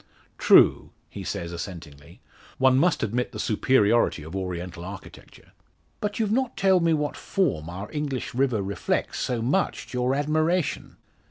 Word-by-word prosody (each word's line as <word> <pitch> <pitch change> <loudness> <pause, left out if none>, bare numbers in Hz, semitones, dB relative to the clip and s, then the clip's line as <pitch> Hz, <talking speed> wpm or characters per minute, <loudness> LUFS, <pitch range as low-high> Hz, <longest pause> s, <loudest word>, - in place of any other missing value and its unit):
"True," - - +5 0.2
he - - -7
says, 85 0 -4
assentingly. 85 -5 -9 0.4
"One 130 0 +4
must 170 -2 +2
admit 120 +3 -2
the - - -6
superiority 110 - +2
of 80 +4 -8
Oriental 90 -2 -5
architecture." 95 +1 -11 0.5
"But 205 0 -3
you've 215 -2 0
not 255 +1 0
told 190 -3 +3
me 165 - +3
what 150 -1 -2
form 140 - -1
our 95 +4 -6
English 145 -4 -3
river 125 -5 +1
reflects, 100 +1 -2
so 120 -3 -1
much 160 +11 0
to 125 - -3
your 125 +2 +1
admiration!" 155 +3 0
125 Hz, 150 wpm, -25 LUFS, 95-155 Hz, 0.5 s, True